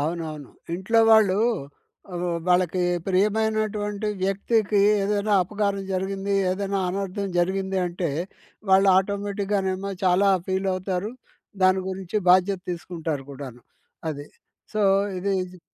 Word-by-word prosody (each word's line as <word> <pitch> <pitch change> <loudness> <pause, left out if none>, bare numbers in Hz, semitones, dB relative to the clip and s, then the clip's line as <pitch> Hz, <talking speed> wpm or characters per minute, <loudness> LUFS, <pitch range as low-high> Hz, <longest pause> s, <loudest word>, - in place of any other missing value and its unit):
అవునవును. 155 -2 -4 0.3
ఇంట్లో 210 +6 +2
వాళ్ళు 205 -3 +5 0.8
ఆహ్, 175 0 -3 0.2
వాళ్ళకి 180 0 +2 0.2
ప్రియమైనటువంటి 210 +1 0
వ్యక్తికి 200 +2 +1 0.2
ఏదైనా 205 +1 0
అపకారం 200 +1 -2
జరిగింది, 195 +1 -2 0.2
ఏదైనా 195 +1 -1
అనర్థం 195 +1 -3
జరిగింది. 190 +2 0
అంటే 175 0 -3 0.6
వాళ్ళు 195 +1 +6
ఆటోమేటిక్‌గానేమో 200 -1 -2
చాలా 185 +2 +4 0.2
ఫీలవుతారు. 190 +1 -1 0.5
దాని 185 0 +4
గురించి 190 +1 -4
బాధ్యత 185 +1 +4
తీసుకుంటారు 165 -4 -4
కూడాను 130 -3 -9 0.5
అది. 145 -1 -7 0.5
సో, 215 - +1 0.4
ఇది 200 +2 -2
ఇది 185 0 -13
190 Hz, 105 wpm, -24 LUFS, 180-200 Hz, 0.8 s, వాళ్ళు